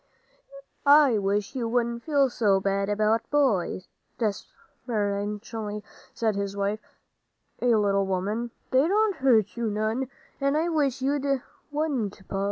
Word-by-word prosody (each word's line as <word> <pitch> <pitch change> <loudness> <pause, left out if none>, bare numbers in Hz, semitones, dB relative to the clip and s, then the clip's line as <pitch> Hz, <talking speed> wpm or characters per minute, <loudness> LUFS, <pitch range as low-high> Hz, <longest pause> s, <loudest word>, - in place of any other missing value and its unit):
"I 285 -6 +6
wish 200 +2 -1
you 240 -4 -2
wouldn't 235 0 0
feel 280 -1 +2
so 210 -5 +2
about 205 +3 +1
boys," 220 -11 +1 0.3
deprecatingly 210 0 -3 0.3
said 220 -3 0
his 200 0 -3
wife, 200 +2 -1 0.8
a 245 -2 +4
little 200 -2 +2
woman; 205 +6 -1 0.2
"they 265 +4 +4
don't 415 +1 +2
hurt 235 -7 +3
you 235 -2 -1
none, 220 +5 -1 0.3
and 275 +1 +1
I 330 +2 +1
wish 280 -5 0
you 275 -1 0 0.3
wouldn't, 260 -11 -2
Pa." 195 - -3
225 Hz, 125 wpm, -26 LUFS, 205-270 Hz, 0.8 s, I